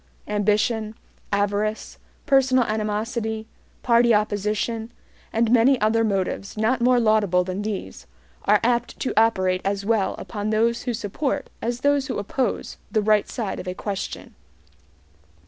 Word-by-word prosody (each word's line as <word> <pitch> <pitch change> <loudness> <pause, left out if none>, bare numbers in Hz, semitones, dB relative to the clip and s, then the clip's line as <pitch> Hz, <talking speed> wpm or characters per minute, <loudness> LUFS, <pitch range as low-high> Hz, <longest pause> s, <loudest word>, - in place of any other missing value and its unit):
Ambition, 210 +1 0 0.4
avarice, 205 +2 -1 0.3
personal 265 -3 +4
animosity, 220 +1 -2 0.4
party 235 -1 +4
opposition, 210 +2 -1 0.4
and 225 0 +1
many 250 +2 +5
other 220 +2 +2
motives 195 -1 -2
not 230 +3 +1
more 250 0 +4
laudable 215 -5 +3
than 185 +2 -4
these, 195 - -5 0.4
are 210 0 +5
apt 240 0 0
to - - -2
operate 185 -5 +2
as 200 0 -2
well 220 -3 +1
upon 210 -1 -4
those 230 +2 +1
who 245 - -1
support 265 +6 -3
as 240 +1 -2
those 285 -1 +2
who 260 - -3
oppose 225 +6 -2
the 215 -2 +1
right 215 0 +3
side 215 -5 -4
of 185 - -7
a 180 - -3
question. 200 -1 -5
215 Hz, 135 wpm, -23 LUFS, 205-235 Hz, 0.4 s, many